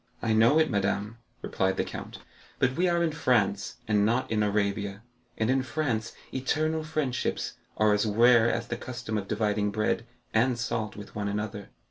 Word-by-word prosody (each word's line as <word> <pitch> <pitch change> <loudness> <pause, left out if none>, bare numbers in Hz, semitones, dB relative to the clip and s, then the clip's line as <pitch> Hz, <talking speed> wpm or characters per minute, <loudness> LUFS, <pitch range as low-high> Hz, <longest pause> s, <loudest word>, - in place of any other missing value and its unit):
"I 110 - 0
know 115 +7 +5
it, 155 -3 +3
madame," 105 +2 -1 0.2
replied 95 0 0
the - - +2
count; - - -7 0.4
"but 130 - +2
we 180 +4 +2
are 170 0 +2
in 165 - +1
France, 110 -9 +1
and 105 -2 +3
not 115 +4 +1
in 110 -1 +2
Arabia, 100 0 -1 0.3
and 110 +2 +1
in 135 0 +2
France 125 -4 -2 0.2
eternal 155 +4 0
friendships 155 -5 -2 0.2
are 110 -1 +4
as 105 +2 +1
rare 120 +2 +5
as 115 0 -3
the 120 - -2
custom 125 -3 -5
of 100 -2 -2
dividing 105 -1 0
bread 110 +3 -1 0.3
and 120 +2 +3
salt 110 -2 -2
with 105 -1 -10
one 105 -1 -3
another." 105 -1 -4
110 Hz, 175 wpm, -28 LUFS, 105-125 Hz, 0.4 s, know